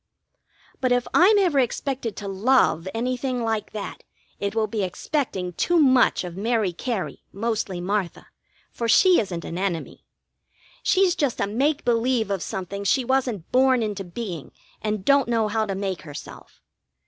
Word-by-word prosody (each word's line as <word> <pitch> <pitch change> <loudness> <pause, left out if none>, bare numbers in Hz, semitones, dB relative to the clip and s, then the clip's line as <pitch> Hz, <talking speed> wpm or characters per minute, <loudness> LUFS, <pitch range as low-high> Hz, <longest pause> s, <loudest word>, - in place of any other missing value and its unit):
But 255 -1 0
if 245 0 +2
I'm 405 +5 +6
ever 350 -8 +3
expected 255 -2 -1
to 205 - -6
love 195 -4 +2
anything 250 +2 -2
like 225 -2 -2
that, 210 -2 -6 0.4
it 200 +1 -2
will 220 -1 +2
be 215 0 -3
expecting 190 - -2
too 345 - +1
much 260 -9 +4
of 175 -1 -7
Mary 215 -2 0
Cary, 225 +1 -4
mostly 215 -3 -2
Martha, 190 0 -2 0.5
for 230 -1 -3
she 365 +9 +6
isn't 180 -6 -3
an 170 - -5
enemy. 185 -4 -3 0.8
She's 375 -2 +3
just 285 -9 -1
a - - +2
make 275 +9 0
believe 235 -2 +1
of 195 -3 -1
something 195 +2 -5
she 250 +6 +2
wasn't 245 -8 -1
born 260 -1 +4
into 205 -2 -3
being 175 - -6 0.3
and 210 -2 -2
don't 280 -3 +4
know 225 -2 +2
how 220 0 0
to 195 - -2
make 195 -1 -3
herself. 145 -3 -11
225 Hz, 160 wpm, -24 LUFS, 195-255 Hz, 0.8 s, I'm